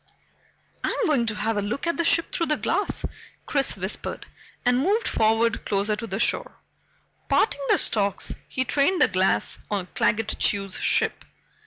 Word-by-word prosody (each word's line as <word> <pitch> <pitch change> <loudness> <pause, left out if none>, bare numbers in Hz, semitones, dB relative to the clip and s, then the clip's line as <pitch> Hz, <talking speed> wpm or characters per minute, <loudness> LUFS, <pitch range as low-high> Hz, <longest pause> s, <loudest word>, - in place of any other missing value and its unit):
"I'm - - 0
going 265 -7 +2
to 220 - -1
have 215 +1 -1
a - - +1
look 225 +10 -3
at 335 - 0
the 335 - 0
ship 335 0 +2
through 335 - 0
the 300 - +1
glass," 400 +4 0 0.4
Chris 275 -6 +1
whispered, 190 +2 -3 0.4
and 245 0 +3
moved 405 - +1
forward 225 +1 +2
closer 205 +1 0
to 230 +2 -6
the - - -3
shore. - - 0 0.7
Parting 285 - +2
the - - +5
stalks, 200 -2 0
he 260 - -2
trained 290 +8 +2
the - - +6
glass 185 -1 0
on 200 -3 -1
Claggett 220 0 +1
Chew's 195 -2 0
ship. - - +1
225 Hz, 165 wpm, -25 LUFS, 205-290 Hz, 0.7 s, the